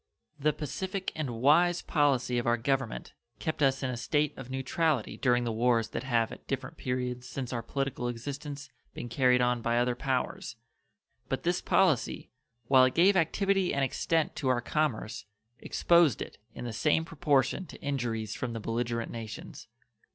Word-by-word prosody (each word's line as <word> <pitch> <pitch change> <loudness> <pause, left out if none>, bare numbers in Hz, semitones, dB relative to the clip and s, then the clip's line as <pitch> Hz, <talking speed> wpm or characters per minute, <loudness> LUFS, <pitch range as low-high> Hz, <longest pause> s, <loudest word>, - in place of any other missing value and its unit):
The 150 +2 +3
pacific 185 +6 -4
and 155 -4 -2
wise 175 +5 +4
policy 130 -5 +2
of 120 - -3
our 120 0 +3
Government 125 - -2 0.2
kept 155 -1 -3
us 135 -1 +2
in 130 - 0
a - - -3
state 145 +4 0
of 135 -2 -9
neutrality 135 0 0
during 125 -1 +2
the 120 - -1
wars 115 0 +2
that - - -4
have 120 -3 +1
at - - -11
different - - -3
periods 125 0 -3
since 125 0 -4
our 120 - -1
political 135 0 -2
existence 140 +4 -6 0.2
been 120 - -6
carried 125 +1 +3
on 125 -1 +2
by 115 +1 +1
other 125 +1 +2
powers; 125 -1 -2 0.7
but - - -2
this 175 +1 +1
policy, 180 -10 +1 0.4
while 130 -1 +7
it 130 - 0
gave 190 +4 +5
activity 190 +1 +2
and 140 - +1
extent 160 +4 0
to 135 - -2
our 125 -1 +3
commerce, 120 -5 -2 0.3
exposed 170 - +3
it - - -7 0.2
in - - -6
the 120 - -4
same 155 +8 +2
proportion 150 0 +1
to - - -11
injuries 120 -6 -2
from 125 -2 -4
the 115 - -4
belligerent 115 +1 -2
nations. 110 -2 -8
130 Hz, 170 wpm, -30 LUFS, 120-150 Hz, 0.7 s, while